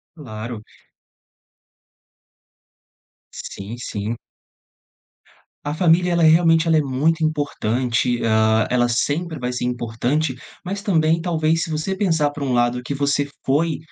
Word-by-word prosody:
Claro. 115 -6 -7 2.7
Sim, 100 +4 -7
sim. 110 -1 -4 1.5
A 145 - -2
família, 175 +2 +3
ela 170 -1 +3
é, - - +7
realmente, 165 0 +4
ela 165 -1 +4
é - - +5
muito 150 +5 0
importante, 125 -5 0
hã, 110 0 +3
ela 120 -1 +2
sempre 155 +7 -1
vai 125 -1 -3
ser 125 - -3
importante, 125 +4 -1 0.3
mas 195 +2 -4
também, 165 -5 +2
talvez, 165 -1 +1
se - - -3
você 155 +5 -2
pensar 165 -7 +1
por 145 - -7
um 135 -2 -1
lado 120 0 +1
que 140 - -4
você 140 0 0 0.2
foi, 155 +4 +1
145 Hz, 130 wpm, -21 LUFS, 120-165 Hz, 2.7 s, é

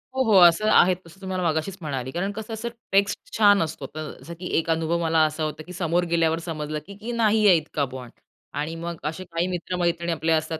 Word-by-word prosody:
हो, 265 - +2
हो. 225 -4 +2
असं 175 +6 +4
आहे 185 -3 +6
तसं 170 +4 -16
तुम्हाला 185 -1 -3
मगाशीच 160 +5 -2
म्हणाली. 135 -5 -4
कारण 185 +7 -2
कसं 220 +2 -7
असं 225 +2 -4 0.2
टेक्स्ट 200 - +1
छान 205 -2 +6
असतो. 155 -3 -5
अ, - - -5 0.2
जसं 160 +6 -9
की 180 - -5
एक 165 +1 -1
अनुभव 165 +1 +1
मला 165 -1 +2
असा 155 +1 -2
होता, 155 0 -4
की 180 - -11
समोर 175 -1 0
गेल्यावर 165 -1 +2
समजलं 155 -2 -3
की 205 +4 -7
नाही 220 -2 +3
आहे 180 -4 +7
इतका 150 -2 -2
बॉन्ड. 125 -2 -8 0.5
आणि 155 +3 -3
मग 170 0 -5
असे 160 +4 -4
काही 170 0 -2
मित्रमैत्रिणी 175 -1 -1
आपले 165 0 -1
असतात 160 0 0
170 Hz, 215 wpm, -24 LUFS, 160-195 Hz, 0.5 s, आहे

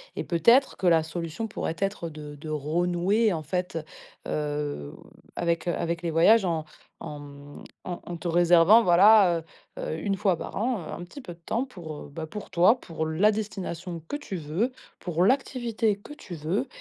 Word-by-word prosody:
et - - -3
peut-être 235 - +4
que - - -4
la 165 -2 +5
solution 165 +6 -4
pourrait 195 -5 -3
être 195 -4 -2
de 150 -1 -9
de 155 +2 -9
renouer, 175 +8 +1
en, 160 - -3
fait, 180 +3 -3 0.5
heu, 145 - -3 0.4
avec, 170 -1 -1
heu, 175 - +1
avec 170 0 -2
les 170 -2 -2
voyages 195 +6 +5
en 165 -3 -1 0.3
en, 150 - -7
mmh, 145 0 -12 0.2
en 175 -1 -4
en 175 - -5
te 170 - -5
réservant, 175 +5 +6
voilà, 185 -1 +6 0.4
heu - - -5
heu, 160 - -3
1 195 +2 0
fois 185 -2 +1
par - - -7
an 240 +3 0
un 175 - -6
petit 180 +11 -10
peu 175 - -8
de 170 - -21
temps 235 +4 -1
pour, 175 -11 -9
heu, 145 - -10
bah, 160 +1 -5
pour 210 +5 -8
toi, 185 +9 +5
pour 160 -5 -4
la 180 +7 +3
destination 185 -5 -5
que - - -3
tu 290 -9 -7
veux, 170 - -1 0.3
pour 175 0 0
l'activité 235 -4 +1
que 205 +8 -11
tu 200 -12 -9
veux 175 - -2
175 Hz, 190 wpm, -26 LUFS, 160-210 Hz, 0.5 s, réservant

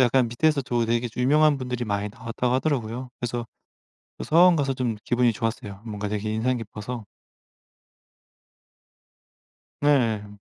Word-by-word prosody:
약간 125 0 +4
밑에서 145 +5 +2
저 120 -2 0
되게 120 +1 0
유명한 145 +4 +4
분들이 125 -1 -3
많이 100 -1 -1
나왔다고 115 +3 -2
하더라고요. 130 -3 -1
그래서 120 -1 -3 0.7
그 - - -5
서원 175 +2 +6
가서 140 -3 +1
좀 125 -4 -1
기분이 120 -1 +2
좋았어요. 110 -4 -4
뭔가 105 -2 -4
되게 105 +1 -2
인상 125 +3 +1
깊어서 115 +1 -6 2.8
네 145 - +2
예 115 -7 +3
헴. 105 0 -13
120 Hz, 300 characters per minute, -25 LUFS, 110-130 Hz, 2.8 s, 서원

